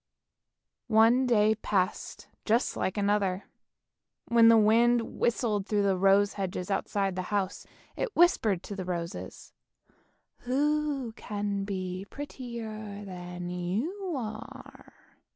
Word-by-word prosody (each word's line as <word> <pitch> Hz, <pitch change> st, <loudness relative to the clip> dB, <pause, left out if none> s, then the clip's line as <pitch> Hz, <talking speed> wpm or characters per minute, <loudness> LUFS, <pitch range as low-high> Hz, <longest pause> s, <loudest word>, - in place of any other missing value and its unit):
One 235 Hz, +3 st, +4 dB
day 215 Hz, -2 st, +4 dB
passed 195 Hz, -3 st, -2 dB, 0.2 s
just 230 Hz, +3 st, +1 dB
like 190 Hz, -, -2 dB
another. 200 Hz, -2 st, +1 dB, 0.9 s
When 230 Hz, -1 st, +6 dB
the 230 Hz, 0 st, +7 dB
wind 230 Hz, +2 st, +3 dB
whistled 220 Hz, -4 st, 0 dB
through 205 Hz, -2 st, +1 dB
the 195 Hz, -1 st, +2 dB
rose 195 Hz, +2 st, +4 dB
hedges 190 Hz, -1 st, -4 dB
outside 195 Hz, -1 st, -1 dB
the 185 Hz, -, -2 dB
house, 200 Hz, -2 st, -2 dB, 0.3 s
it 470 Hz, -, -3 dB
whispered 225 Hz, -, +3 dB
to 200 Hz, -, -6 dB
the 190 Hz, -, -4 dB
roses, 170 Hz, -1 st, -6 dB, 0.9 s
"Who 285 Hz, 0 st, 0 dB
can 205 Hz, -3 st, -3 dB
be 185 Hz, -1 st, -4 dB
prettier 220 Hz, -7 st, -7 dB
than 180 Hz, -1 st, -7 dB
you 235 Hz, -, -3 dB
are? 220 Hz, -4 st, -8 dB
210 Hz, 115 wpm, -29 LUFS, 195-235 Hz, 0.9 s, the